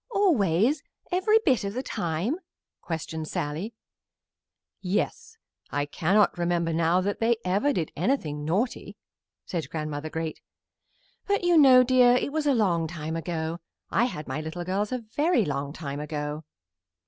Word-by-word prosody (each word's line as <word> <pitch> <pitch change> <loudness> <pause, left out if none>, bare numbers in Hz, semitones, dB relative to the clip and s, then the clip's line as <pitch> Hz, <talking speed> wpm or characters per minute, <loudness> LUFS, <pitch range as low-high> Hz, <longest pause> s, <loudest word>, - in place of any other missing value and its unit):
"Always, 275 - +2 0.3
every 375 +5 +4
bit 260 - +3
of 200 +2 -4
the 255 - -2
time?" 175 - -2 0.4
questioned 160 -1 -4
Sallie. 165 +13 -3 1.1
"Yes; 440 - -2 0.3
I 145 0 -1
cannot 185 +6 +2
remember 170 -1 0
now 165 +2 +2
that 200 +2 -2
they 230 +1 +2
ever 200 +10 +2
did 170 - -2
anything 160 - -1
naughty," 195 - -2 0.5
said 160 -7 -4
Grandmother 155 -1 -4
Great. 160 0 -4 0.9
"But 405 -2 +1
you 350 -1 +4
know, 265 -5 +8
dear, 250 -1 +5
it 265 - 0
was 305 0 -1
a 280 - +4
long 175 -7 +2
time 160 -1 -5
ago. 165 0 -3 0.3
I 235 - +3
had 155 - -5
my 135 +3 -3
little 160 +3 -5
girls 195 +4 -1
a 255 - 0
very 250 - +1
long 140 -1 -2
time 145 -3 -5
ago." 150 0 -4
180 Hz, 150 wpm, -27 LUFS, 160-250 Hz, 1.1 s, know